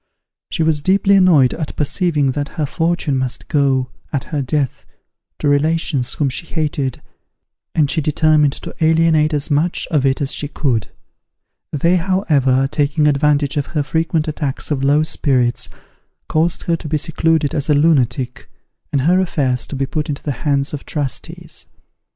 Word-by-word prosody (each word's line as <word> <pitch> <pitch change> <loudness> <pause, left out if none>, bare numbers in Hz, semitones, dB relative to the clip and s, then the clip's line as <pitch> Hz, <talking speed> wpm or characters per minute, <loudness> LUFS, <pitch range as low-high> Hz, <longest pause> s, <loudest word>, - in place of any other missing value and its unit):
She 165 - -1
was 155 -2 +1
deeply 195 +4 +3
annoyed 170 -9 +5
at 155 -3 -5
perceiving 150 -2 +1
that 145 +1 -3
her 155 - +1
fortune 165 -2 0
must 130 -1 -4
go, 135 -3 +1 0.2
at 140 -4 -1
her 150 -3 -3
death, 135 0 -2 0.5
to - - -2
relations 145 -2 +1
whom 145 - 0
she 135 +5 -2
hated, 145 -5 -2 0.7
and 150 -3 +3
she 160 +3 0
determined 150 -1 +3
to - - -8
alienate 160 -1 +3
as 150 0 -1
much 155 +5 +1
of 150 -5 +2
it 135 -1 +1
as 140 -1 -1
she 145 - -3
could. 125 -7 -1 0.8
They, 170 +5 +2
however, 150 -8 +2
taking 150 +1 +1
advantage 145 0 +2
of 145 - -1
her 145 - +2
frequent 160 +1 -1
attacks 150 -2 -3
of 135 -2 -1
low 145 +2 +3
spirits, 130 -6 0 0.6
caused 165 +2 0
her 170 - +1
to 160 - -8
be 155 +1 0
secluded 160 -1 0
as 145 0 -2
a 150 - +5
lunatic, 135 -4 +1 0.4
and 140 - +1
her 175 +7 +3
affairs 135 -9 0
to - - -6
be 135 0 -1
put 150 +4 -3
into 140 - -4
the 145 - -2
hands 140 -1 0
of 145 - -5
trustees. 145 -4 -5
150 Hz, 165 wpm, -18 LUFS, 140-160 Hz, 0.8 s, annoyed